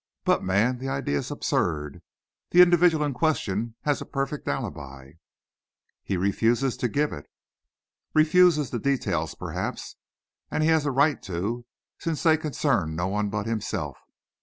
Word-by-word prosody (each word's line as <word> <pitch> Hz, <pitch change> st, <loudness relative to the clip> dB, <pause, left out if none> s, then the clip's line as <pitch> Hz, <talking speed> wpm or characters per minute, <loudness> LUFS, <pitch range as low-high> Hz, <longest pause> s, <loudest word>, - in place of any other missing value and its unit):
But, -, -, +2 dB
man, 110 Hz, +7 st, +1 dB
the 135 Hz, +1 st, -4 dB
idea 135 Hz, -, -1 dB
is -, -, -5 dB
absurd. 75 Hz, -2 st, -2 dB, 0.5 s
The 180 Hz, +1 st, +8 dB
individual 175 Hz, -3 st, +4 dB
in 145 Hz, -, -2 dB
question 115 Hz, -, -1 dB
has 145 Hz, -1 st, 0 dB
a -, -, -5 dB
perfect 135 Hz, +1 st, -3 dB
alibi." 70 Hz, -, -5 dB, 0.9 s
"He 95 Hz, -, -2 dB
refuses 115 Hz, +7 st, +1 dB
to 125 Hz, -, 0 dB
give 145 Hz, +6 st, 0 dB
it." 75 Hz, -, -9 dB, 0.9 s
"Refuses 155 Hz, -2 st, +4 dB
the 120 Hz, -, -2 dB
details, 140 Hz, +2 st, -1 dB
perhaps. -, -, -5 dB, 0.5 s
And 155 Hz, -, 0 dB
he 160 Hz, -, +3 dB
has 160 Hz, -2 st, +3 dB
a -, -, +1 dB
right 140 Hz, +3 st, +2 dB
to, 110 Hz, +8 st, -3 dB, 0.3 s
since 165 Hz, -3 st, -3 dB
they 160 Hz, -1 st, +5 dB
concern 140 Hz, -, -1 dB
no 90 Hz, +3 st, -1 dB
one 105 Hz, +1 st, -1 dB
but 105 Hz, 0 st, -3 dB
himself. 105 Hz, -, -3 dB
125 Hz, 150 wpm, -26 LUFS, 100-150 Hz, 0.9 s, The